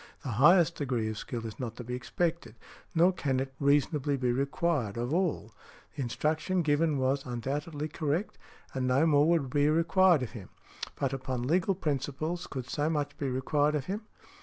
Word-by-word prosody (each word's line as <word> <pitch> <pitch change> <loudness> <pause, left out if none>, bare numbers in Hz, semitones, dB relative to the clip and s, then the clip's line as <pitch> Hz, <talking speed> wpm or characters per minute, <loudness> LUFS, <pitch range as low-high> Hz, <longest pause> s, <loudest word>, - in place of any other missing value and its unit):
The 135 - -4
highest 170 - +5
degree 125 -6 -1
of 110 - -7
skill 115 -2 -5
is 110 - -7
not 120 -4 -4
to 125 - -7
be 125 +1 -6
expected, 165 +1 -2 0.4
nor 175 +3 +5
can 135 -6 -1
it 135 0 -4
reasonably 145 0 +2
be 125 -2 +1
required, 140 -3 0
of 120 +4 -2
all. 165 - -1 0.4
The 145 - -4
instruction 155 +8 0
given 150 0 +2
was 135 +1 +1
undoubtedly 145 +5 -3
correct, 155 +5 -2 0.3
and 130 -1 -1
no 130 +5 +3
more 150 0 +4
would 155 -7 +1
be 145 +1 +3
required 165 0 +4
of 115 - -5
him. 105 -6 -9 0.5
But, 135 -1 -1
upon 130 -2 -3
legal 175 +8 +1
principles, 155 +1 -2
could 130 -3 -6
so 145 +2 -1
much 145 -3 -2
be 140 - -1
required 145 +4 +1
of 140 -3 -2
him? 200 +5 -3
145 Hz, 180 wpm, -30 LUFS, 130-160 Hz, 0.5 s, highest